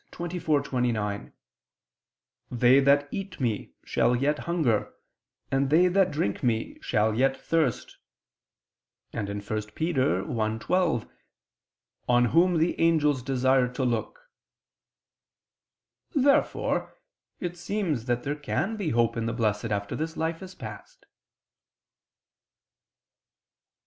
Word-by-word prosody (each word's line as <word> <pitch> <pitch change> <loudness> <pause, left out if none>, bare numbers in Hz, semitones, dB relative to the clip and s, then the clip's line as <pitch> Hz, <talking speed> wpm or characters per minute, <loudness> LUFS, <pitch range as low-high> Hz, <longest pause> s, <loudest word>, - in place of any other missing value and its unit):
24:29: 130 - -1 1.2
"They 125 +2 +5
that 140 +1 +4
eat 195 -3 -6
me, 115 -6 -2
shall 125 - +2
yet 145 +4 +1
hunger, 145 -11 0 0.6
and 135 0 +1
they 170 +5 +5
that 190 0 +3
drink 125 - -2
me, 115 -2 -1
shall 110 -1 +1
yet 135 +4 +2
thirst," 160 -8 -1 1.2
and 105 - -3
1 100 0 -4
Pet. - - -19
1:12: 120 - 0 1.0
"On 120 0 +5
Whom 170 +6 +3
the 160 +2 +1
angels 150 -5 +3
desire 130 0 +2
to 125 +1 -3
look." 125 - -2 1.9
Therefore 280 0 +1 0.4
it 175 -1 -4
seems 175 - -2
that 120 -1 -1
there 145 +1 -2
can 175 +8 -2
be 195 -6 -2
hope 115 -2 +2
in 115 -1 -2
the 115 - -1
Blessed 110 -2 0
after 100 -2 -2
this 160 +1 -4
life 165 +1 -2
is 190 0 -10
past. - - -10
135 Hz, 110 wpm, -27 LUFS, 115-165 Hz, 1.9 s, They